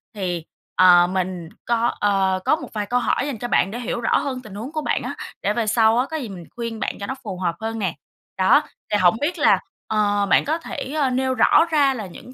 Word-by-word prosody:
Thì, 175 -5 -3 0.3
ờ, 175 -1 +7
mình 180 -2 -3 0.2
có, 235 0 +1
ờ, 195 -2 +2
có 310 - +4
một 275 -6 -9
vài 210 -2 -2
câu 245 +3 +1
hỏi 255 - 0
dành 275 - -4
cho 240 +3 -4
bạn 195 -4 +2
để 240 - -5
hiểu 240 0 -3
rõ 225 - +2
hơn 265 -3 -3
tình 210 -4 -11
huống 240 +8 -6
của 310 - -3
bạn - - -1
á, - - -4 0.3
để 205 - 0
về 225 0 -1
sau 220 +1 +4
á 255 - +2
có 320 - -2
gì 255 -7 -5
mình 185 -3 -8
khuyên 230 -2 -5
bạn - - -2
cho 200 - -5
nó 265 - -3
phù 200 -5 -5
hợp 175 -2 -1
hơn 225 0 -4
nè. 190 -5 -2 0.4
Đó, 190 +11 +5 0.3
thì 210 - +3
hổng 185 +1 +4
biết 340 +5 -1
là, 295 - +5 0.3
ờ, 205 -1 +1
bạn - - +4
có 310 +3 0
thể, 300 -4 -6
ờ, 275 - +2
nêu 260 +1 0
rõ 255 +6 +5
ra 285 -3 +4
là 220 -6 -5
những 245 +8 -12
220 Hz, 255 wpm, -22 LUFS, 190-255 Hz, 0.4 s, ờ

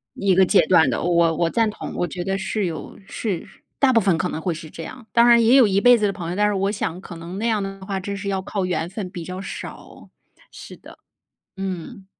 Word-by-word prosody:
一 200 -1 +2
个 190 +1 +5
阶 - - +5
段 160 -6 +5
的。 120 - -1
我 170 -2 +3
我 170 0 +1
赞 225 +1 +1
同 210 - -7
我 175 - -1
觉 175 -1 -5
得 195 +1 -1
是 200 +1 -2
有 165 -2 -6
是 195 -7 -4 0.3
大 275 -2 +4
部 230 - +5
分 185 -4 +2
可 180 0 -1
能 160 - -5
会 175 0 -1
是 160 0 -9
这 165 - -8
样。 255 +4 -10
当 235 0 +5
然 235 -1 +6
也 235 +4 +5
有 255 -5 +7
一 195 0 +2
辈 245 0 +7
子 215 - 0
的 200 - 0
朋 170 -3 -6
友， 180 - -3
但 210 +1 +2
是 210 - 0
我 195 +1 0
想 185 -4 -3
可 170 - -10
能 170 +3 -8
那 225 - -1
样 220 -3 +1
的 195 -1 -6
话 195 -1 -3
真 200 +1 -5
是 200 0 -4
要 190 -1 -1
靠 190 0 -3
缘 175 -2 -2
分， 190 -1 -6
比 175 -4 -7
较 185 +2 -6
少。 195 - -9 0.4
是 - - -11
的， - - -15 0.6
嗯。 190 +2 -6
195 Hz, 275 characters per minute, -22 LUFS, 175-210 Hz, 0.6 s, 有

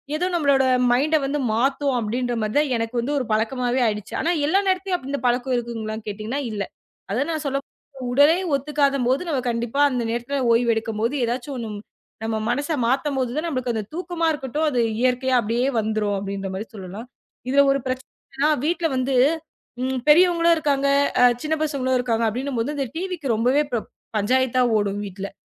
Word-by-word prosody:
ஏதோ 355 +4 0
நம்மளோட 280 -5 +3 0.3
மைண்ட் 285 +6 +3
வந்து 285 +2 -1
மாத்தும் 270 +3 +1
அப்படின்ற 240 +3 -2
மாதிரி 215 0 -2
தான். 295 -1 +3
எனக்கு 230 +1 -3
வந்து 240 +5 -2
ஒரு 265 - -1
பழக்கமாவே 245 +3 0
ஆயிடுச்சு. 210 +1 -4
ஆனா 330 - 0 0.2
எல்லா 320 +7 +3
நேரத்திலும் 370 -4 0
இந்தப் 280 -2 -3
பழக்கம் 250 +2 +1
இருக்குங்களா? 230 -2 -3
கேட்டிங்கன்னா 215 +6 -3
இல்ல. 205 -2 -2 0.5
அத 235 +7 +1
நான் 315 -2 -2
சொல்ல 275 -1 0 0.4
போ 255 - -5
உடலே 290 +5 +6 0.2
ஒத்துக்காதபோது 275 0 +1
நாம 285 -5 0
கண்டிப்பா 235 +3 -2
அந்த 250 -3 -1
நேரத்துல 240 +4 -2
ஓய்வு 235 0 +3
எடுக்கும்போது 225 +3 -2
எதாச்சும் 250 +4 -3
ஒன்னு 230 -2 -5 0.5
நம்ம 220 0 -1
மனசை 285 +6 0
மாத்தும்போது 265 -1 0
தான் 320 +2 -1
நம்மளுக்கு 255 -6 -2
அந்த 220 - -2
தூக்கமா 350 -1 -2
இருக்கட்டும். 295 +1 -2
அது 250 -4 +1 0.2
இயற்கையா 255 0 +2
அப்படியே 235 +4 0
வந்துரும் 215 -2 0
அப்படின்ற 195 0 -4
மாதிரி 200 +4 -5
சொல்லலாம். 200 +4 -8 0.4
இதுல 280 +2 +5
ஒரு 275 - +1
பிரச்சனை 255 0 -4 0.3
என்னென்னா, 290 +3 +3 0.2
வீட்டுல 340 +1 +1
வந்து, 260 +1 0 0.7
ம் 260 0 -1
பெரியவங்களும் 340 +1 +5
இருக்காங்க, 280 -2 +1 0.3
அ - - +8 0.2
சின்னப் 310 0 0
பசங்களும் 260 -4 0
இருக்காங்க 230 -2 0
அப்படின்னும் 255 +2 -3
போது, 290 +6 -3
இந்த 275 -2 -1
டிவி 365 +1 -3 0.2
ரொம்பவே 250 +7 +3 0.5
பஞ்சாயத்தா 255 +4 +2
ஓடும். 205 -1 -1
வீட்டுல 195 +1 -6
255 Hz, 165 wpm, -23 LUFS, 230-285 Hz, 0.7 s, அ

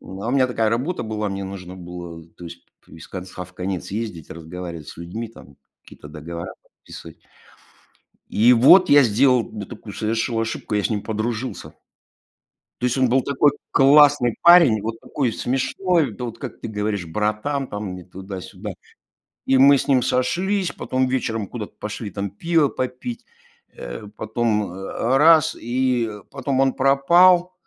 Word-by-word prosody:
Ну, 95 - -10
у - - -1
меня 130 0 +3
такая 115 -3 0
работа 130 +11 -2
была, 110 -1 -3
мне 100 0 -4
нужно 95 -1 -8
было, 85 -2 -9
то 90 - -11
есть 85 0 -11 0.2
из 80 - -12
конца 90 0 -7
в 90 - -17
конец 90 0 -4
ездить, 100 -7 -5
разговаривать 85 -1 -8
с - - -10
людьми, 90 +8 -6
там 70 -11 -16 0.3
какие-то 75 - -14
договора 80 +3 -7
подписывать. - - -14 1.1
И 120 +4 +4
вот 175 +10 +6
я 145 0 +7
сделал, 125 +2 +3
да, 105 -2 -6
такую 110 -1 -10
совершил 115 +2 -1
ошибку- 110 -1 -3
я 105 - 0
с - - 0
ним 105 -2 -1
подружился. 115 +3 -4 1.1
То - - +2
есть 125 +2 -1
он 130 -1 +3
был 130 +3 +3
такой 140 +2 +2 0.2
классный 140 -3 +5
парень, 170 - +7
вот 115 +1 -4
такой 125 0 -2
смешной, 160 - 0
да, 125 - -7
вот 115 -2 -6
как 130 -5 -8
ты - - -5
говоришь, 105 -4 -3
"братан" 105 - -2
там, 105 -2 -5
не 90 - -9
туда-сюда. 95 +1 -8 0.7
И 135 - +3
мы 140 +1 +7
с 140 - -3
ним 135 -3 +3
сошлись, 185 +11 0
потом 130 0 -1
вечером 115 -5 -2
куда-то 105 0 -8
пошли 105 0 -6
там 100 0 -4
пива 160 - +1
попить, 125 -2 -5 0.5
э, - - -8
потом, 110 0 -1
а, 95 +7 -2
раз 160 +2 +5
и 125 -1 -1 0.2
потом 135 -1 -2
он 135 0 +3
пропал, 175 +7 +4
115 Hz, 160 wpm, -22 LUFS, 100-135 Hz, 1.1 s, я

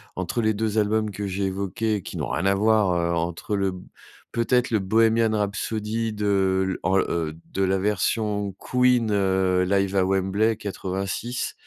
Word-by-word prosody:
entre 95 +6 -2
les 110 0 +2
2 110 +1 -2
albums 105 0 +1
que 100 +1 -4
j'ai 95 +1 -2
évoqués 100 +3 -1
et 100 - -4
qui - - -8
n'ont - - -3
rien 95 - -1
à 100 0 +3
voir, 105 -2 +3
heu, 85 0 0
entre 85 +4 -3
eux. - - 0
Le 95 -1 0 0.6
peut-être 120 +1 +1
le 110 - +2
Bohémien 115 +3 +3
rhapsody 105 +2 -2
de, 95 -2 +1
l - - -3
en 95 +2 +2
de 85 +3 -2
la 95 +1 +2
version 105 0 0
Queen, 125 -3 +2
heu, 95 -2 +2
live 100 0 +1
à 95 - +3
Wembley 95 +4 +1
86 100 +5 -3
100 Hz, 170 wpm, -24 LUFS, 95-110 Hz, 0.6 s, à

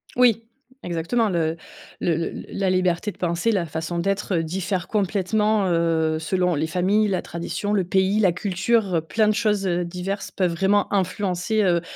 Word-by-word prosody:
Oui, 240 -3 +4 0.4
exactement 175 +7 0
le 165 -3 0 0.4
le 170 - +1
le 165 - -4
la 195 -1 -1
liberté 185 +2 +1
de - - -21
penser, 175 +5 0
la 190 -5 0
façon 160 +2 -4
d'être, 195 +1 -1
heu, 165 - +1
diffère 180 +2 -3
complètement, 210 +1 +1
heu, 160 -2 +1
selon 180 +2 0
les 155 +1 -1
familles, 190 +6 +2
la 190 -2 -1
tradition, 185 +5 -3
le 195 - +2
pays, 190 +3 +1
la 195 -4 +4
culture, 190 +2 0
heu, - - 0
plein 215 +7 +1
de 215 - +3
choses, 210 -3 +1
heu, 175 -1 0
diverses 185 +3 -4
peuvent 185 -3 0
vraiment 195 +4 +1
influencer, 190 +2 0
heu, 175 -3 +2
185 Hz, 175 wpm, -23 LUFS, 170-205 Hz, 0.4 s, Oui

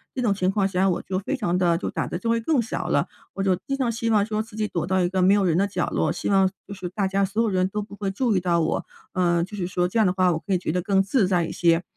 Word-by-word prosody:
这 255 - -2
种 215 -4 +3
情 185 -2 0
况 195 0 +1
下 190 0 +1
我 175 - 0
就 185 -1 -2
非 270 +8 -2
常 180 -8 0
地 170 -2 +3
就 180 - -4
胆 - - -3
子 - - -3
就 210 - -5
会 230 0 +2
更 290 +4 +1
小 235 0 -2
了。 - - +1 0.3
我 195 - -2
就 190 -2 +3
经 275 - -1
常 255 -3 0
希 230 0 -2
望 210 -2 +3
说 215 0 -1
自 220 0 -10
己 215 -1 -1
躲 170 -5 -3
到 190 0 +2
一 175 - +1
个 190 0 0
没 190 +2 +5
有 200 -2 +2
人 170 -3 +2
的 200 +2 +2
角 200 - -2
落， - - +1
希 - - -3
望 195 -1 +4 0.2
就 200 - -7
是 185 -2 -6
大 195 +2 -1
家 195 +1 +1
所 205 +4 -1
有 225 - +1
人 185 -1 +1
都 210 +2 -3
不 200 0 -9
会 200 -1 -3
注 220 +3 0
意 - - +3
到 175 -1 +1
我。 - - -1 0.3
呃， 175 -2 +2
就 210 +4 -7
是 180 -3 -2
说 180 -1 0
这 225 - 0
样 220 - +5
的 180 - +1
话， 185 -1 +3
我 160 - -1
可 195 +3 -3
以 - - +4
觉 175 - -3
得 180 +2 0
更 195 +1 +2
自 200 0 +2
在 180 -3 +1
一 - - -5
些。 170 0 +2
195 Hz, 355 characters per minute, -24 LUFS, 180-210 Hz, 0.3 s, 没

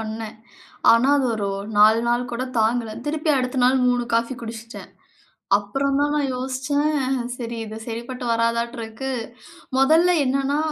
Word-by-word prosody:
பண்ணேன். 220 0 -6 0.6
ஆனா, 230 +4 +4
அது 265 - +1
ஒரு 200 -2 -2 0.3
4 220 +2 +6
நாள் 240 +1 0
கூட 235 +2 -2 0.2
தாங்கல. 225 0 +1 0.2
திருப்பி 310 +1 0
அடுத்த 255 +1 -2
நாள் 260 +1 +4
3 245 -1 +1
காஃபி 230 +3 0
குடிச்சுட்டேன். 230 +1 -8 0.7
அப்புறம் 275 +7 -1
தான் 290 0 +1
நான் 290 -2 0
யோசிச்சேன். 270 +2 -1 0.2
சரி 235 -1 -5
இது 220 0 -8
சரிப்பட்டு 240 +2 -6
வராதாட்டு 230 +1 0
இருக்கு. 225 +4 -6 0.7
மொதல்ல 320 +6 +4
என்னன்னா 275 +2 0
245 Hz, 140 wpm, -22 LUFS, 230-270 Hz, 0.7 s, 4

